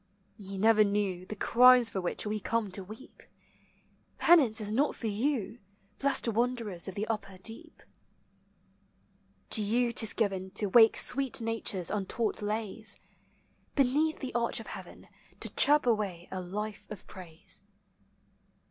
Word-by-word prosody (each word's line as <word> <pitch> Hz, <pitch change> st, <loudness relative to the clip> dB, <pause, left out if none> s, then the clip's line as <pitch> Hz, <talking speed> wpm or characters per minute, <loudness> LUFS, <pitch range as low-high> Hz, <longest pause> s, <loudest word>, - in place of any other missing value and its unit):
Ye 195 Hz, -2 st, -8 dB
never 215 Hz, +2 st, +4 dB
knew 200 Hz, -3 st, -2 dB
The 215 Hz, -, -6 dB
crimes 250 Hz, +3 st, +5 dB
for 190 Hz, -, -4 dB
which 180 Hz, -, -2 dB
we 210 Hz, 0 st, -2 dB
come 220 Hz, -1 st, -2 dB
to 190 Hz, +1 st, -4 dB
weep. 215 Hz, +7 st, -13 dB, 1.0 s
Penance 270 Hz, -11 st, +4 dB
is 210 Hz, -1 st, -3 dB
not 275 Hz, +7 st, +1 dB
for -, -, -8 dB
you, 225 Hz, +1 st, -2 dB, 0.4 s
Blessed 275 Hz, -3 st, +2 dB
wanderers 230 Hz, -5 st, -1 dB
of 190 Hz, -, -7 dB
the 210 Hz, +1 st, -2 dB
upper 210 Hz, -4 st, -5 dB
deep. 225 Hz, +5 st, -8 dB, 1.7 s
To 220 Hz, -, +6 dB
you 235 Hz, +4 st, +1 dB
't -, -, +2 dB
is 220 Hz, -, +1 dB
given 195 Hz, -4 st, -1 dB
To 210 Hz, -, +3 dB
wake 225 Hz, +2 st, +6 dB
sweet 270 Hz, -1 st, +2 dB
Nature's 225 Hz, -6 st, -2 dB
untaught 210 Hz, +2 st, -2 dB
lays; 215 Hz, +1 st, -4 dB, 0.8 s
Beneath 295 Hz, +4 st, +2 dB
the 260 Hz, -, -5 dB
arch 235 Hz, -1 st, 0 dB
of -, -, -9 dB
heaven -, -, -10 dB, 0.3 s
To -, -, -5 dB
chirp 295 Hz, 0 st, +5 dB
away 205 Hz, -7 st, -1 dB
a 185 Hz, -, -4 dB
life 210 Hz, +3 st, -6 dB
of 210 Hz, -, -9 dB
praise. 170 Hz, -4 st, -11 dB
215 Hz, 145 wpm, -29 LUFS, 195-240 Hz, 1.7 s, To